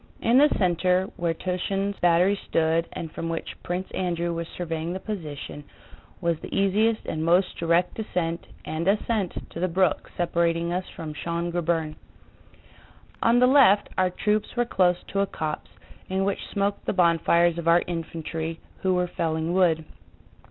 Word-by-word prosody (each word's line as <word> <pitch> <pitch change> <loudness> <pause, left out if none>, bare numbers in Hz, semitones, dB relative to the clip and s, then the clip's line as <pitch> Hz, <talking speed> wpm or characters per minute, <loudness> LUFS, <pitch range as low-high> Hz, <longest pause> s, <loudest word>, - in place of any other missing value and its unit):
In 240 +3 +4
the 295 +1 +6
center, 180 0 +2
where 170 -1 -1
Túshin's 195 +3 -2
battery 175 +3 +4
stood 165 +1 +2
and 160 - -6
from 165 - -4
which 165 0 -4
Prince 180 +2 -3
Andrew 175 -2 -1
was 170 0 -4
surveying 165 -1 -3
the 190 - -4
position, 155 -8 -6 0.6
was 170 -3 0
the - - -8
easiest 210 +3 +2
and 155 0 -3
most 175 +3 +3
direct 170 +2 +2
descent 175 -6 -3 0.2
and 160 +3 -3
ascent 205 -1 +1 0.2
to - - -7
the 185 - +1
brook 185 -2 +1
separating 170 0 +1
us 185 +1 -2
from 155 -2 -6
Schön 170 +3 -3
Grabern. 165 -2 -1 1.2
On 230 +1 +4
the 250 - +6
left 250 -6 +5
our 185 0 +2
troops 210 +5 -1
were 240 0 +2
close 180 -6 +2
to 195 - -1
a 200 - +2
copse, 155 -4 -4 0.4
in 190 +1 0
which 200 - -2
smoked 200 0 -1
the - - +1
bonfires 170 -1 +3
of 170 - -5
our 170 +1 +5
infantry 165 -1 -4 0.2
who 185 -1 +2
were 180 0 +2
felling 160 -1 -2
wood. 170 -4 +3
175 Hz, 160 wpm, -25 LUFS, 165-190 Hz, 1.2 s, the